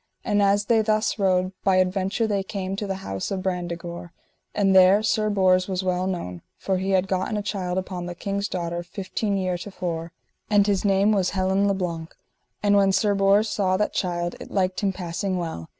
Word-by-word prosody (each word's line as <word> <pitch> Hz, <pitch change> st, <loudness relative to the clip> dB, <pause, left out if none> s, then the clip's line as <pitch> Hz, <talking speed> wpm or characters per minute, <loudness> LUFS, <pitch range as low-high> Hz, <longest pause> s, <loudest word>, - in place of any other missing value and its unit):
And 205 Hz, 0 st, +2 dB
as 200 Hz, +1 st, +3 dB
they 225 Hz, 0 st, +3 dB
thus 215 Hz, 0 st, 0 dB
rode, 185 Hz, -1 st, +2 dB
by 195 Hz, -2 st, +3 dB
adventure 190 Hz, +4 st, +1 dB
they 205 Hz, -2 st, 0 dB
came 190 Hz, -1 st, -4 dB
to 205 Hz, +1 st, -4 dB
the 195 Hz, -, -2 dB
house 95 Hz, -1 st, -3 dB
of 190 Hz, -2 st, -3 dB
Brandegore, 175 Hz, -2 st, -4 dB, 0.4 s
and 195 Hz, -2 st, +3 dB
there 190 Hz, +3 st, +6 dB
Sir 215 Hz, 0 st, +1 dB
Bors 185 Hz, -2 st, +3 dB
was 190 Hz, -1 st, -2 dB
well 185 Hz, 0 st, 0 dB
known, 90 Hz, -, -4 dB, 0.2 s
for 190 Hz, -1 st, -1 dB
he 190 Hz, +1 st, -2 dB
had 190 Hz, 0 st, +2 dB
gotten 190 Hz, +3 st, -1 dB
a 205 Hz, -, -2 dB
child 185 Hz, -3 st, -3 dB
upon 180 Hz, -1 st, -4 dB
the 175 Hz, -, -6 dB
king's 200 Hz, +2 st, -2 dB
daughter 170 Hz, -2 st, -3 dB
fifteen 195 Hz, +3 st, -3 dB
year 185 Hz, -2 st, -1 dB
to 205 Hz, -, -7 dB
fore, 170 Hz, -3 st, -4 dB, 0.4 s
and 205 Hz, -2 st, +4 dB
his 200 Hz, -2 st, +1 dB
name 200 Hz, +1 st, +3 dB
was 195 Hz, -4 st, +2 dB
Helin 190 Hz, +1 st, +1 dB
le 200 Hz, -, +2 dB
Blank. 170 Hz, -3 st, -4 dB, 0.5 s
And 205 Hz, 0 st, +4 dB
when 195 Hz, -1 st, +4 dB
Sir 205 Hz, +1 st, +2 dB
Bors 200 Hz, +2 st, +3 dB
saw 190 Hz, -3 st, +1 dB
that 210 Hz, -, 0 dB
child 175 Hz, -2 st, -1 dB
it -, -, -9 dB
liked 185 Hz, -2 st, 0 dB
him 200 Hz, -2 st, +1 dB
passing 185 Hz, +1 st, -3 dB
well. 160 Hz, -, -5 dB
190 Hz, 205 wpm, -24 LUFS, 180-200 Hz, 0.5 s, there